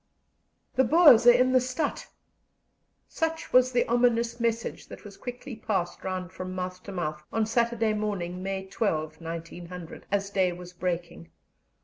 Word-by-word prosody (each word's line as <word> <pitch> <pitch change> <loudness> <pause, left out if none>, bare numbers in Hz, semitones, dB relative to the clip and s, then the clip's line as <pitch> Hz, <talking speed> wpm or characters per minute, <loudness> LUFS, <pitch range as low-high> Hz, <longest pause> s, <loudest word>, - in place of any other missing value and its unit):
"The 260 - +4
Boers 285 -5 +7
are - - +12
in 250 +1 +4
the 255 -1 +5
stadt!" 270 +4 -2 1.0
Such 325 -1 -3
was 255 0 +6
the 240 -1 +2
ominous 235 0 +2
message 230 -1 -2
that - - -11
was 200 -1 -11
quickly 245 +2 -7
passed 185 -5 -2
round 185 -1 -4
from 185 0 -6
mouth 180 0 -4
to 200 - -7
mouth 155 -5 -3
on 225 -1 +1
Saturday 230 -1 +1
morning, 190 -4 -3
May 190 0 -3
12, 170 -6 -2
1900, 170 +1 -8
as 200 0 0
day 185 -3 +2
was 180 0 -10
breaking. 175 - -4
200 Hz, 150 wpm, -27 LUFS, 180-240 Hz, 1.0 s, are